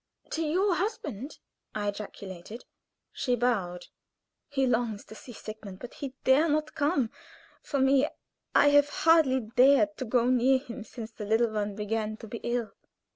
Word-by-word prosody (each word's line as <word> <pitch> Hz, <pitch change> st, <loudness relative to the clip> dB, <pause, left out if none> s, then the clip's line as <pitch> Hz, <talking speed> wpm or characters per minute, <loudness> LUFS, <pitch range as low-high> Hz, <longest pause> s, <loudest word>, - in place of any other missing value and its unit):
"To 320 Hz, -, -1 dB
your 365 Hz, +5 st, +2 dB
husband!" 295 Hz, -, -4 dB, 0.4 s
I 205 Hz, -1 st, -1 dB
ejaculated. 200 Hz, +1 st, -8 dB, 0.5 s
She 250 Hz, -2 st, 0 dB
bowed. 200 Hz, -8 st, -1 dB, 0.6 s
"He 270 Hz, -1 st, +1 dB
longs 230 Hz, -4 st, 0 dB
to -, -, -12 dB
see 245 Hz, -, -11 dB
Sigmund, 215 Hz, -4 st, -9 dB
but 245 Hz, -, -9 dB, 0.3 s
dare 290 Hz, +5 st, +4 dB
not 305 Hz, +1 st, 0 dB
come. 290 Hz, -6 st, +1 dB, 0.5 s
For 285 Hz, -, -3 dB
me, 270 Hz, +1 st, +4 dB, 0.5 s
I 290 Hz, -, +7 dB
have 290 Hz, 0 st, +5 dB
hardly 310 Hz, -5 st, +4 dB
dared 270 Hz, +7 st, +4 dB
to 260 Hz, -, -4 dB
go 240 Hz, +1 st, +2 dB
near 255 Hz, +1 st, +4 dB
him 255 Hz, -3 st, -8 dB
since 225 Hz, +1 st, -8 dB
the 215 Hz, -2 st, -7 dB
little 225 Hz, +2 st, +2 dB
one 205 Hz, -1 st, -2 dB
began 215 Hz, +1 st, -2 dB
to 225 Hz, -, -10 dB
be 230 Hz, +2 st, -6 dB
ill. 240 Hz, -2 st, -2 dB
245 Hz, 155 wpm, -28 LUFS, 215-285 Hz, 0.6 s, I